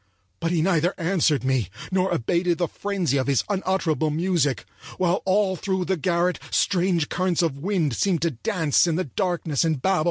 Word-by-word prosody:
But 165 - -1
he 165 -2 +1
neither 175 -1 +1
answered 165 -5 +1
me 130 -7 0 0.2
nor 185 0 +1
abated 170 +7 0
the 175 - 0
frenzy 185 -9 -1
of 130 - -1
his 140 -4 +2
unutterable 185 -6 0
music, 160 -3 0 0.3
while 180 0 +1
all 190 0 +2
through 190 +1 -2
the 190 - 0
garret 175 +2 0
strange 175 -5 +1
currents 180 -2 0
of 145 -5 -1
wind 165 - 0
seemed 180 - 0
to 170 - +1
dance 165 - +1
in 165 - +1
the 185 - 0
darkness 170 - -1
and 160 -4 0
babel. 190 +6 +1
175 Hz, 180 wpm, -24 LUFS, 155-185 Hz, 0.3 s, his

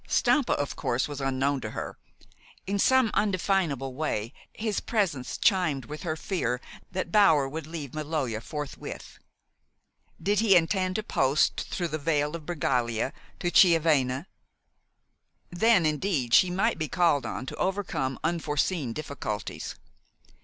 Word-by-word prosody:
Stampa, 285 -5 +3
of 145 - -2
course, 120 +1 -1
was 145 -2 -6
unknown 135 +1 0
to 110 - -4
her. - - -5 0.7
In 200 +1 -1
some 260 0 +4
indefinable 185 -9 0
way 125 -6 -2 0.2
his 215 -2 -2
presence 185 - -1
chimed 175 - +2
with 150 +1 -7
her 165 -4 -2
fear 155 - -2 0.3
that 185 -2 -3
Bower 160 -10 +5
would 155 +3 -6
leave 155 -5 -6
Maloja 150 -7 -2
forthwith. 145 +2 -7 1.0
Did 205 0 +1
he 215 -4 +5
intend 185 +2 +2
to 215 - -1
post 140 -7 +1
through 175 -2 -2
the 155 - -3
Vale 150 0 0
of 160 -3 -9
Bregaglia 125 -7 0 0.3
to 175 - 0
Chiavenna? 155 -6 +4 1.3
Then, 185 0 +4
indeed, 150 -5 0
she 185 - +7
might 195 +2 0
be 155 - -1
called 145 -5 +2
on 110 +4 -4
to - - -6
overcome 170 -9 -1
unforeseen 150 -4 0
difficulties. 140 -8 -5
155 Hz, 135 wpm, -27 LUFS, 135-185 Hz, 1.3 s, she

